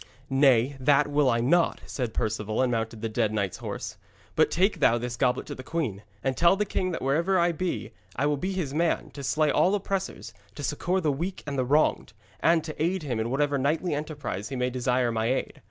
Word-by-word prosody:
'Nay, 135 -1 +4
that 140 +2 +4
will 145 -2 +3
I 115 -1 +2
not,' 170 +8 +2
said 125 -4 -3
Perceval, 110 +2 -1
and 125 - +1
mounted 115 -1 -2
the - - +1
dead 110 -1 0
knight's 100 -4 -1
horse. - - -6 0.4
'But - - +4
take 185 +1 +1
thou 120 -5 +4
this 120 0 -4
goblet 125 0 +1
to - - -6
the - - -8
queen, 130 - -3 0.2
and 135 -1 0
tell 170 +5 +5
the 210 +1 0
king 185 -1 -1
that 170 - -4
wherever 165 +8 +2
I 175 0 +3
be, 175 +2 -3 0.2
I 140 - 0
will 150 0 +2
be 185 +7 -2
his 175 -8 -3
man, 165 +2 0
to 145 - -8
slay 150 +2 +2
all 190 +7 +3
oppressors, 195 - -3 0.2
to 145 - -7
succour 175 +6 0
the 155 -4 +2
weak 170 +7 -4
and 145 -1 -4
the 130 -2 0
wronged, 150 +4 +2 0.3
and 165 +3 +3
to 155 -1 -6
aid 175 +2 0
him 125 -6 -2
in 110 +1 -1
whatever 140 +2 +1
knightly 155 +5 0
enterprise 145 - -4
he 135 - -4
may 125 0 0
desire 125 -1 +1
my 110 0 0
aid. 130 - -2
140 Hz, 220 wpm, -27 LUFS, 125-165 Hz, 0.4 s, tell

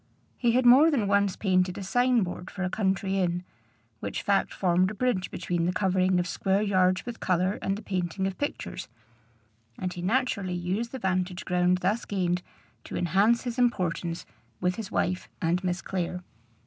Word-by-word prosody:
He 235 -2 +1
had 255 +1 +3
more 265 +7 +8
than 265 -9 +1
once 200 -1 +2
painted 185 -2 +1
a 200 - -5
sign 245 +3 +3
board 180 0 -6
for 190 - -5
a 180 - -1
country 195 -1 0
inn, 175 -1 0 0.6
which 100 - -4
fact 200 -1 +2
formed 185 0 +2
a 215 - -7
bridge 205 -5 0
between 175 -1 -1
the - - +2
covering 185 -1 +2
of 175 - 0
square 195 +3 0
yards 185 -2 +2
with 240 -1 -6
color 185 +2 +1
and 195 +1 -1
the 215 - -9
painting 185 -1 -2
of 195 -1 -2
pictures; 290 - -4 0.9
and 185 -1 -3
he 175 - -6
naturally 200 -3 0
used 185 +7 -2
the 265 - -5
vantage 185 -3 -1
ground 180 0 +2
thus 205 +6 +1
gained 180 -3 0 0.4
to - - -5
enhance 200 +7 +3
his 245 0 -4
importance 175 -8 0 0.3
with 180 0 0
his 220 -4 -5
wife 180 +1 -1
and 175 +3 0
Miss 180 0 -2
Clare. 180 -1 -3
190 Hz, 180 wpm, -27 LUFS, 180-210 Hz, 0.9 s, more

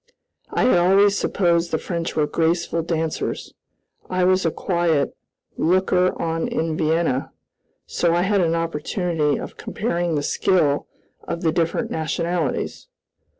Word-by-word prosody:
I - - 0
had 215 -8 +4
always 195 +3 +4
supposed 170 -4 +1
the 160 - 0
French 170 0 -4
were 155 - +2
graceful 165 +2 0
dancers. 165 -1 -3 0.6
I 185 0 +1
was 185 -1 +3
a - - +3
quiet 170 -4 0 0.4
"looker 185 +1 +2
on 165 0 -1
in 160 -1 -1
Vienna," 160 -4 0 0.5
so 170 -1 +1
I 175 - +2
had 200 0 +2
an 165 -1 +1
opportunity 165 -1 -1
of - - -8
comparing 175 -6 -2
the 145 - -1
skill 145 -3 +1 0.4
of 170 +1 -4
the 160 - +3
different 165 0 -1
nationalities. 170 - -2
170 Hz, 135 wpm, -22 LUFS, 160-180 Hz, 0.6 s, had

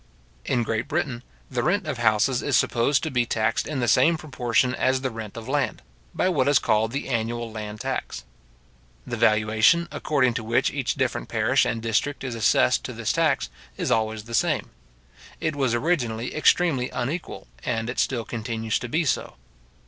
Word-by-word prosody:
In 120 -2 +1
Great 115 0 -2
Britain 140 -6 -2 0.3
the 125 -2 0
rent 180 - +1
of 145 -6 -3
houses 115 +3 +2
is 140 -6 +2
supposed 120 +7 +2
to 160 - -2
be 125 -2 +1
taxed 110 -1 0
in 145 -4 -2
the 120 - 0
same 165 +6 +4
proportion 130 -4 0
as 130 0 +1
the 130 -1 -2
rent 110 -1 -8
of 115 0 -7
land, 140 -1 -1 0.3
by - - +1
what 145 -8 +1
is 145 - +5
called 110 0 +1
the 135 +3 -3
annual 115 -1 -2
land 105 -1 -6
tax. - - -4 0.8
The - - -4
valuation, 110 +10 +3
according 135 -5 +1
to 115 - -3
which 115 +2 +1
each - - -2
different - - -2
parish - - +2
and 115 0 -2
district 115 +6 -1
is 130 -3 -3
assessed 110 - +3
to - - -5
this - - -1
tax, - - +1 0.3
is - - -1
always 110 0 0
the 115 +1 -10
same. - - +1 0.7
It 155 -2 -1
was 130 -4 +1
originally 120 -5 -1
extremely 155 -4 +2
unequal, 140 +8 -4 0.2
and 115 -2 -1
it 120 - -3
still 120 -4 0
continues 110 -1 -2
to 120 - -6
be 165 +6 +1
so. 130 - -1
120 Hz, 180 wpm, -24 LUFS, 110-140 Hz, 0.8 s, is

